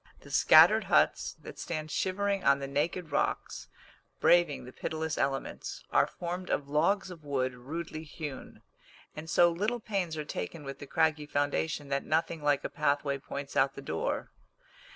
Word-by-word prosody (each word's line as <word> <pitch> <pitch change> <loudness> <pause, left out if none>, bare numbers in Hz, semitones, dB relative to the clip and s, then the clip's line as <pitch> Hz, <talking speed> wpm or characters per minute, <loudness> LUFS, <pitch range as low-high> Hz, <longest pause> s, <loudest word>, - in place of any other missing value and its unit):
The - - -13
scattered - - +7
huts - - +2
that - - -10
stand 155 -2 -4
shivering 200 +1 0
on 140 0 +5
the 140 - -5
naked 155 +4 -2
rocks, - - -1 0.5
braving 170 -7 +3
the 125 - -11
pitiless 160 -1 -3
elements, 135 0 -3
are - - +4
formed 180 +1 -5
of 140 - -1
logs 170 +7 +1
of 165 -3 -11
wood 130 -3 -1
rudely 155 +5 -6
hewn; 150 -3 -8 0.5
and 160 +1 -7
so 175 0 +5
little 210 +8 -1
pains 190 -7 -2
are 150 - -3
taken 145 - -5
with 135 -1 -7
the 145 - -9
craggy 155 -1 +1
foundation 145 0 -1
that 140 0 0
nothing 160 0 0
like 145 -1 +2
a - - -1
pathway 145 -2 0
points 140 +1 -7
out 135 0 +3
the - - -7
door. 80 -8 -2
155 Hz, 165 wpm, -30 LUFS, 140-170 Hz, 0.5 s, scattered